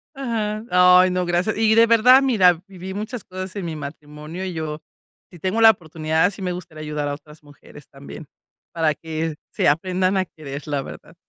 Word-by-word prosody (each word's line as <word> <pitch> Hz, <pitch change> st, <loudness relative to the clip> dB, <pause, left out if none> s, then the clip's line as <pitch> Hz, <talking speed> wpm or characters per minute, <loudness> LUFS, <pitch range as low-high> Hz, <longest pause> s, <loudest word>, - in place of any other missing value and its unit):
Ajá, 220 Hz, -5 st, -3 dB, 0.4 s
ay 185 Hz, -, +2 dB
no, 180 Hz, 0 st, -1 dB
gracias. 175 Hz, +4 st, 0 dB
Y 220 Hz, 0 st, +3 dB
de 230 Hz, +1 st, +6 dB
verdad, 240 Hz, +3 st, +6 dB
mira, 185 Hz, -10 st, +3 dB
viví 190 Hz, -1 st, -9 dB
muchas 215 Hz, +2 st, -6 dB
cosas 185 Hz, +1 st, -7 dB
en 200 Hz, -, -4 dB
mi 165 Hz, -2 st, -5 dB
matrimonio 150 Hz, +4 st, -8 dB
y 185 Hz, -, -4 dB
yo, 155 Hz, -2 st, -5 dB, 0.5 s
si 175 Hz, -, -14 dB
tengo 190 Hz, +7 st, -1 dB
la 225 Hz, -, +10 dB
oportunidad, 160 Hz, -1 st, 0 dB
sí 195 Hz, 0 st, -10 dB
me 180 Hz, -1 st, -2 dB
gustaría 165 Hz, -3 st, -9 dB
ayudar 150 Hz, -1 st, -3 dB
a 145 Hz, -, -2 dB
otras 150 Hz, +1 st, -15 dB
mujeres 145 Hz, 0 st, -16 dB
también 140 Hz, +3 st, -11 dB, 0.5 s
para 160 Hz, -3 st, +1 dB
que 160 Hz, -1 st, -4 dB, 0.2 s
se -, -, +1 dB
aprendan 185 Hz, +5 st, +1 dB
a 185 Hz, -, 0 dB
querer. 145 Hz, -3 st, -9 dB
La 145 Hz, -2 st, -1 dB
verdad. 165 Hz, -, -12 dB
175 Hz, 190 wpm, -21 LUFS, 155-195 Hz, 0.5 s, la